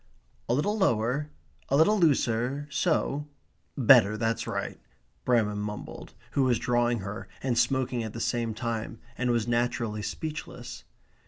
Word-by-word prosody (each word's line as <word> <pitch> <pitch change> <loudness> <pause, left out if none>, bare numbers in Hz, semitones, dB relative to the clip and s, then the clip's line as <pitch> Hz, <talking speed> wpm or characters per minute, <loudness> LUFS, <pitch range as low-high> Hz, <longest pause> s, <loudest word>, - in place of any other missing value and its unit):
"A 120 - +3
little 205 +10 +1
lower, 135 - +1 0.4
a 140 - +3
little 205 +7 +5
looser, 140 -3 +1
so 150 -3 0 0.5
better, 115 -5 +6
that's 115 +1 -1
right," - - -3 0.5
Bramham 105 -4 +2
mumbled, 105 0 -7 0.2
who 140 - +1
was 125 -2 +3
drawing 120 -1 +1
her, 100 +3 -6 0.2
and 130 -3 +1
smoking 125 0 +1
at 110 -1 -6
the 115 - -6
same 115 -1 -1
time, 115 -1 -3 0.2
and 125 +1 -1
was 120 -2 +1
naturally 120 -2 0
speechless. 155 +9 -6
120 Hz, 140 wpm, -28 LUFS, 115-135 Hz, 0.5 s, better